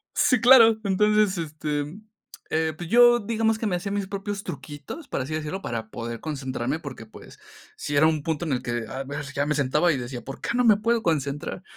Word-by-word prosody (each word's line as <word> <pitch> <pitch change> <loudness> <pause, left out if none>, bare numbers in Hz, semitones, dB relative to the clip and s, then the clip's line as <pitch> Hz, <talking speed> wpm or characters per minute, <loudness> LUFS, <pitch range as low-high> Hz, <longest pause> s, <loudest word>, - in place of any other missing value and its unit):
Sí, 250 -3 +3
claro. 230 -3 +7
Entonces, 210 0 +2
este, 150 0 -4 0.5
eh, 160 0 0
pues, 175 0 -6
yo 240 0 +6
digamos 225 0 0
que 220 - -4
me 190 - 0
hacía 185 +3 -4
mis 200 -1 -2
propios 200 +1 -5
truquitos, 145 - -8
por - - -2
así 135 +4 -5
decirlo, 155 +5 -4
para 115 -5 -5
poder 115 0 -6
concentrarme, 135 -2 -3
porque, 135 -7 -9
pues, - - -14 0.4
sí 145 - -4
era 155 - +5
un 160 -1 +2
punto 160 +2 -2
en 145 - -1
el 125 - -1
que, 120 -1 -3
a 130 +4 -5
ver, 140 +2 -5
ya 145 0 0
me 150 - 0
sentaba 150 +5 +2
y 150 - 0
decía: 120 -1 -6
"¿Por 135 +1 -8
qué - - -5
no 250 - +3
me 215 -3 +6
puedo 230 +2 +1
concentrar?" 150 0 -2
155 Hz, 215 wpm, -25 LUFS, 140-205 Hz, 0.5 s, claro